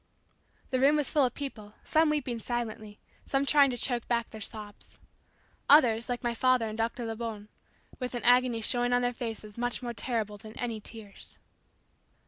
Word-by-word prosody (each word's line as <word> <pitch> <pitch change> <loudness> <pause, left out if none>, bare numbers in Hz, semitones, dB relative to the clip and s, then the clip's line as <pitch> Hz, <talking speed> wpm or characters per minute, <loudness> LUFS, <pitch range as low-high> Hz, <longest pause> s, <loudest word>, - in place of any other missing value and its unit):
The 255 - +1
room 280 +3 +5
was 295 -2 0
full 290 -3 +4
of 250 - -2
people, 215 -7 -6
some 315 0 +3
weeping 255 -6 -1
silently, 220 -3 -4 0.3
some 275 0 +1
trying 285 -1 +5
to 245 - -3
choke 240 -1 -1
back 235 -1 0
their 220 - -9
sobs. 210 -1 -8 0.7
Others, 245 -5 +6
like 245 -1 -2
my 240 -1 0
father 255 -1 +2
and 215 - -5
Dr. 230 +2 -2
Lebon, 225 -2 -5 0.5
with 250 -1 -4
an 240 - -4
agony 245 -1 +4
showing 245 +2 +1
on 245 0 +3
their 245 0 +1
faces 225 -3 -6
much 245 +1 -2
more 240 -1 -3
terrible 215 -3 -3
than 215 0 -12
any 230 -3 -3
tears. 215 -2 -11
240 Hz, 175 wpm, -29 LUFS, 220-255 Hz, 0.7 s, Others